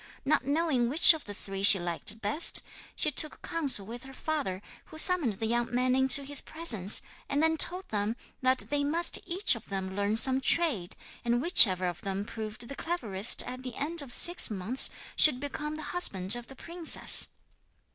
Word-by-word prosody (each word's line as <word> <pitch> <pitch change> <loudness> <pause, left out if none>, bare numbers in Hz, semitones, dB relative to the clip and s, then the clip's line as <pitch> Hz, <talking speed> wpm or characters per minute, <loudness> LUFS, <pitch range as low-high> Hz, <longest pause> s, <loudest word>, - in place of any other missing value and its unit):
Not 275 -2 -1
knowing 285 -5 -2
which 315 +5 +6
of 315 - -10
the 205 - -9
three 195 -1 -9
she 200 0 +7
liked 175 +5 -3
best, 215 +11 +1 0.3
she 305 - +4
took 305 +2 -1
counsel 280 -11 +1
with 235 +4 -11
her 270 0 -14
father, 205 -14 -6 0.2
who 315 - -15
summoned 320 - 0
the 210 +3 -7
young 240 +1 -3
men 255 +1 -1
into 265 +1 +1
his 285 0 -2
presence, 220 - +2 0.3
and 285 +2 -2
then 320 0 0
told 360 +4 +1
them 210 +1 -4 0.3
that 255 0 +1
they 290 0 -2
must 330 +4 +2
each 375 +4 +1
of 230 - -11
them 190 -1 -7
learn 205 +2 -3
some 260 +3 +3
trade, 265 - +1 0.3
and 240 0 -2
whichever 195 - +5
of 175 -1 -8
them 195 +1 -6
proved 220 +1 -10
the 275 - -10
cleverest 230 - 0
at 255 0 -10
the 255 -2 -10
end 315 +3 -4
of 275 -4 -12
six 345 +7 +5
months 215 +5 +2 0.3
should 285 -5 +4
become 300 +2 -7
the 310 - -9
husband 195 - +2
of 240 0 -10
the 270 - -14
princess. 335 +3 +3
255 Hz, 185 wpm, -26 LUFS, 210-310 Hz, 0.3 s, she